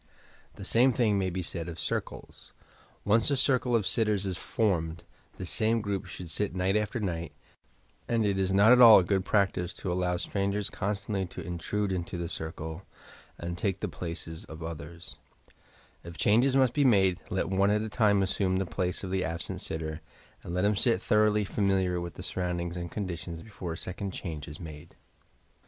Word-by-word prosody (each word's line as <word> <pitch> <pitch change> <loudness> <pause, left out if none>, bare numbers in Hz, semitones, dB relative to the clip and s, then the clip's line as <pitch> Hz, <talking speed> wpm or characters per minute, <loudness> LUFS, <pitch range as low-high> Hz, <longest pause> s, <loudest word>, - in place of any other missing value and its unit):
The - - -8
same 125 +3 +4
thing 110 -6 +2
may 95 -1 0
be 90 +1 -3
said 85 0 -4
of 85 - -8
"circles." - - -5 0.5
Once 110 +4 +4
a 140 - +2
circle 125 -2 +2
of 110 -4 +2
sittera 105 -3 +2
is 95 -2 -1
formed, 85 -6 -1 0.3
this 90 -2 -3
same 115 +1 +2
group 100 -2 -3
should 90 +1 -8
sit 105 0 -1
night 95 +2 +1
after 105 +3 0
night, 85 -5 -3 0.7
and 115 -2 +1
it 100 -1 +1
is 95 0 +1
not 100 +4 +6
at 125 0 +7
all 115 -3 +11
a 95 - +4
good 95 +1 +1
practice 95 -3 +1
to 90 - -3
allow 90 0 0
strangers 100 +2 -1
constantly 100 -1 -2
to - - -8
intrude 95 +4 -2
into 90 -1 -3
the 85 -1 -3
circle 80 +1 -5 0.6
and 85 0 -5
take 95 -1 -1
the - - -2
places 80 0 -6
of 80 +1 -9
others, 85 +1 -7 0.9
If 85 0 -10
changes 120 +6 +3
must 130 -3 +4
be 145 - +2
made, 95 -7 +4
let 95 - -1
one 95 +1 +3
at 105 +1 +2
a - - -3
time 105 -2 +3
assume 95 0 0
the 95 +1 0
place 90 +1 -2
of 95 - -4
the 95 0 0
absent 85 -2 -4
sitter 80 -1 -3 0.4
and - - -8
let 90 +2 +1
iiim 105 -1 +3
get 115 -6 +3
thoroughly 105 -1 +3
familiar 95 -3 +1
with 85 -3 -6
the - - -8
surroundings 85 -1 -3
and 85 -1 -4
conditions 85 -4 -5
before 95 -6 -6
a - - -7
second 95 +2 -4
change 80 -4 -6
is 75 +1 -8
made. 80 -2 -10
95 Hz, 190 wpm, -29 LUFS, 85-105 Hz, 0.9 s, all